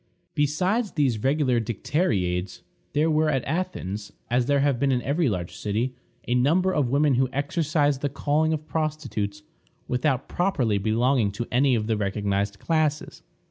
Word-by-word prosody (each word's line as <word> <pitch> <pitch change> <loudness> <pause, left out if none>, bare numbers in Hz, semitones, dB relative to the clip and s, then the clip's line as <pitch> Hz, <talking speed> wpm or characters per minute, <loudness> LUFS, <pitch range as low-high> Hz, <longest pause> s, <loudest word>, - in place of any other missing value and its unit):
" - - -47
Besides 185 - 0
these 130 -8 +1
regular 135 -2 +2
dicteriades, 100 - -1 0.3
there 150 +2 +2
were 155 0 +2
at 135 -4 0
Athens, 130 - -3 0.2
as 120 0 +2
there 140 -1 +3
have 140 -3 +1
been 140 +1 +2
in 125 -1 0
every 145 +1 +1
large 90 -4 -4
city, 110 +5 -2 0.3
a 120 - +1
number 165 +10 +3
of 140 -5 +1
women 140 +2 +3
who 130 +1 +2
exercised 145 -1 0
the 145 - 0
calling 150 +3 +1
of 155 -1 -2
prostitutes, 135 -11 -3 0.4
without 125 +1 0
properly 135 - 0
belonging 115 +2 +2
to 120 +4 -3
any 130 +1 +3
of 110 -2 -1
the 110 -1 0
recognized 100 0 -1
classes. 155 +2 -1
135 Hz, 160 wpm, -25 LUFS, 110-150 Hz, 0.4 s, there